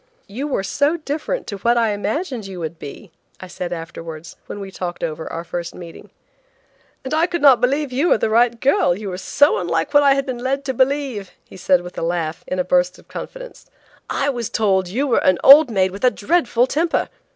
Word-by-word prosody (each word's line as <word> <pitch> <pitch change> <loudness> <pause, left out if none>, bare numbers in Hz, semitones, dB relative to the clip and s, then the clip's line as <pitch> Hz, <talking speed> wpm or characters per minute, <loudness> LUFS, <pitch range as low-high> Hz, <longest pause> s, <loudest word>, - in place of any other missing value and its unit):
"You 245 +9 -5
were 260 -9 -1
so 285 - +1
different 310 - -4
to 200 - -6
what 235 +4 +1
I 230 -2 +2
imagined 220 - -3
you 190 -2 -8
would 160 0 -6
be," 170 +6 -10 0.3
I - - -8
said 180 -1 -6
afterwards, 165 -1 -8
when - - -7
we 195 -1 -7
talked 180 -2 -6
over 160 0 -4
our 165 - -5
first 175 0 -6
meeting. 170 -2 -11 0.9
"And 265 - -5
I 320 +2 +2
could 345 -3 -3
not 265 -5 +6
believe 275 +2 0
you 280 +8 +1
were - - +4
the 220 - 0
right 235 +1 +3
girl, 185 -10 +2
you 205 -1 -6
were 180 0 -5
so 290 +8 +3
unlike 165 - -2
what 290 - +6
I 280 -1 +5
had 275 -1 -1
been 255 -2 -4
led 270 +3 -2
to 265 - -2
believe," 260 -6 -1 0.2
he - - -15
said, 185 -1 +2
with 180 0 -8
a - - -5
laugh, 165 -1 -2
in 185 - -3
a 180 - +1
burst 180 0 +1
of - - -20
confidence. - - -9 0.4
"I 280 - 0
was 240 -4 -4
told 195 -5 +1
that - - -9
you 270 +6 0
were 265 - +1
an 185 -1 +4
old 285 +1 +9
maid 190 -4 +1
with 200 +5 -9
a 250 - +6
dreadful 245 0 +1
temper. 320 +5 0
220 Hz, 225 wpm, -20 LUFS, 180-275 Hz, 0.9 s, old